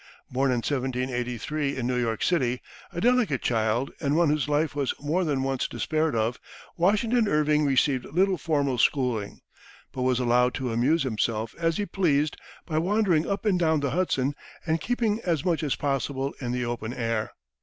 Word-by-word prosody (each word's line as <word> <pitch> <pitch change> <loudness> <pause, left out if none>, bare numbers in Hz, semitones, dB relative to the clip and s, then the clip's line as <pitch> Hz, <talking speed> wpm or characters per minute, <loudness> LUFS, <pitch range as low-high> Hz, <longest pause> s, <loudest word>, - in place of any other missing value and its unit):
Born 135 +2 +1
in 120 -2 0
1783, 130 +1 -2
in 125 - -2
New 125 0 0
York 115 -2 -1
City, 125 -8 +1 0.3
a - - -5
delicate 235 - +2
child 115 +3 0
and 145 -1 0
one 170 -1 +4
whose 150 -1 0
life 150 0 +1
was 140 -3 -1
more 155 +6 0
than 140 -5 0
once 135 -1 -1
despaired 155 -3 -1
of, 115 +2 0 0.4
Washington 215 +6 +2
Irving 150 -2 +2
received 135 -1 +2
little 185 +2 +1
formal 140 -6 0
schooling, 120 -7 0 0.5
but 130 - -5
was 125 -1 +2
allowed 125 0 +2
to 130 -4 -2
amuse 140 +8 +2
himself 110 -2 -1
as 165 -1 +1
he 205 - -1
pleased 155 -6 +1 0.3
by 155 -2 0
wandering 180 -3 +2
up 200 +2 -2
and 195 -4 +2
down 160 -2 +2
the 140 -2 -1
Hudson 145 -6 0 0.3
and 160 -1 0
keeping 230 -3 0
as 165 -2 0
much 170 -3 +1
as 150 -4 0
possible 135 -1 -2
in 120 -2 -2
the 125 0 -1
open 120 0 -4
air. 115 -2 -2
140 Hz, 175 wpm, -26 LUFS, 125-165 Hz, 0.5 s, one